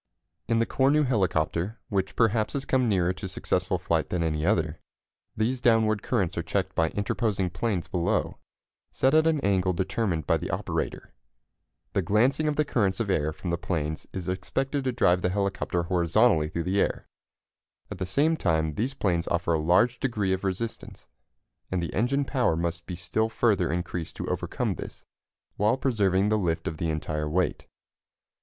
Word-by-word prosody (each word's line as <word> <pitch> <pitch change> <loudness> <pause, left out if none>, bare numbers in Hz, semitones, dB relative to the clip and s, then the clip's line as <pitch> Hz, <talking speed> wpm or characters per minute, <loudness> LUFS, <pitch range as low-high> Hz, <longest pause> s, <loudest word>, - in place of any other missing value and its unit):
In 115 0 +2
the 115 - +3
Cornu 140 +5 +3
helicopter, 95 -2 0
which 95 -1 -1
perhaps 110 -2 +2
has 135 -1 -2
come 130 -3 +2
nearer 90 -3 +2
to 95 +1 -6
successful 90 0 -1
flight 85 -3 -1
than 90 -2 0
any 75 -2 -1
other, 85 -5 +1 0.6
these 120 +4 0
downward 110 -3 +3
currents 90 -4 0
are - - +1
checked - - -2
by 80 -1 +2
interposing 100 -2 -1
planes 95 0 -2
below, 85 -2 -1 0.5
set 130 - +2
at 155 +1 +5
an 160 -2 +2
angle 95 -3 +2
determined 95 -3 -1
by - - +3
the - - -5
operator. - - -3 0.8
The 100 - +2
glancing 120 - +2
of 150 - +1
the 150 - +2
currents 100 -8 0
of 105 -4 0
air 80 -4 +1
from 85 +3 -5
the 85 - -1
planes 80 -4 -3
is 95 -1 -5
expected 135 +9 -2
to 130 - +1
drive 90 -7 +3
the 90 - +1
helicopter 95 -2 -1
horizontally 85 0 +3
through 85 0 -3
the 95 +3 +1
air. - - -1 0.8
At - - -6
the 95 - -2
same 150 - +2
time 80 - 0
these 125 - -2
planes 85 -8 0
offer 85 0 0
a 80 - +2
large 90 +10 +3
degree 105 -8 0
of 95 - -3
resistance, 100 +4 -4 0.6
and 95 - -1
the 85 - -3
engine 135 +7 +1
power 125 - +1
must 85 +1 -3
be 90 - -4
still 90 +5 -1
further 105 -7 +2
increased 85 -1 -4
to - - -5
overcome - - -1
this, - - -9 0.5
while 105 +5 +2
preserving 105 -7 +2
the 110 0 +2
lift 85 -4 -1
of 80 - -3
the 80 +1 -1
entire 75 -1 -2
weight. 90 +3 -1
95 Hz, 175 wpm, -27 LUFS, 85-115 Hz, 0.8 s, at